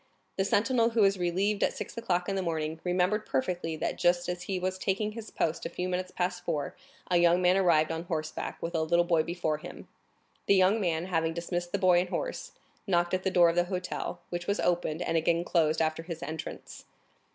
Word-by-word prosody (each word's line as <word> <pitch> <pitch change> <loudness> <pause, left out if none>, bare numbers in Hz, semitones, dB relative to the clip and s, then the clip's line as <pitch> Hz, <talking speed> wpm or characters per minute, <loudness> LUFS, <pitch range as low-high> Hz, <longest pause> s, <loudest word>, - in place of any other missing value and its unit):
The 190 - 0
sentinel 230 +3 +2
who 230 -1 +1
was 195 -1 +4
relieved 190 +4 0
at - - +2
six - - -6
o'clock 180 -6 -1
in 195 - -1
the 190 - 0
morning, 160 -2 -2
remembered 185 +4 +1
perfectly 165 +3 -2
that, - - -3
just 175 0 +2
as 180 0 -3
he 190 -1 -3
was 185 +1 -2
taking 200 +3 -1
his 220 0 -8
post 165 0 -1
a - - -3
few 180 +1 -3
minutes 185 0 -2
past 180 0 -2
four, 150 -5 -2 0.4
a 175 - +5
young 175 0 +5
man 180 0 +4
arrived 165 -5 +3
on 165 +1 -4
horseback, 155 -2 -4
with 170 - -3
a 165 - +1
little 170 +2 +2
boy 170 -2 +3
before 160 -2 -2
him. - - -10 0.6
The 200 - +5
young 190 +4 +4
man, 170 -2 0
having 165 -3 0
dismissed 175 0 -3
the - - 0
boy 185 -3 +5
and 180 0 -1
horse, - - -4 0.3
knocked 175 -2 +1
at 185 - +1
the 190 - 0
door 175 -2 +5
of 165 - -1
the 175 0 +3
hotel, 180 -1 -4
which 175 0 -4
was 200 - 0
opened, 175 -1 0
and 165 - 0
again 165 +1 +2
closed 160 -3 +2
after 155 +1 -1
his 165 0 -7
entrance. 160 -2 -7
175 Hz, 220 wpm, -29 LUFS, 165-185 Hz, 0.6 s, a